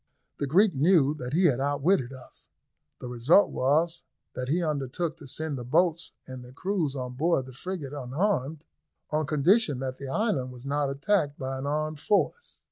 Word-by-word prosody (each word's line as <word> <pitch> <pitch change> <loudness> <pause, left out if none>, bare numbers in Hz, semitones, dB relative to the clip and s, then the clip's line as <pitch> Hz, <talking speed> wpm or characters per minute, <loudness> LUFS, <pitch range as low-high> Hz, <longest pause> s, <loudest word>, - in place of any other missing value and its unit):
The 140 - -1
Greek 190 +7 +4
knew 150 0 +4
that 125 +2 -5
he 180 +4 +3
had 135 -7 +3
outwitted 145 0 +1
us. 130 -2 -12 0.5
The - - -7
result 125 - +4
was 160 +6 +1 0.3
that 125 0 -4
he 170 +4 +1
undertook 155 +2 -2
to 150 -4 -12
send 150 0 -3
the - - -5
boats 165 +6 +1
and 130 -1 -8
their 125 +1 -13
crews 170 -3 -1
on 125 -2 -4
board 145 0 +1
the 130 - -11
frigate 150 -1 -6
unharmed, 145 +2 -1 0.5
on 155 -1 0
condition 155 - +3
that 130 -1 -4
the 140 - -7
island 135 - -1
was 125 +1 -12
not 145 0 0
attacked 145 +1 0
by 135 0 -4
an 135 - -4
armed 155 +1 -2
force. 210 - 0
145 Hz, 180 wpm, -27 LUFS, 130-170 Hz, 0.5 s, Greek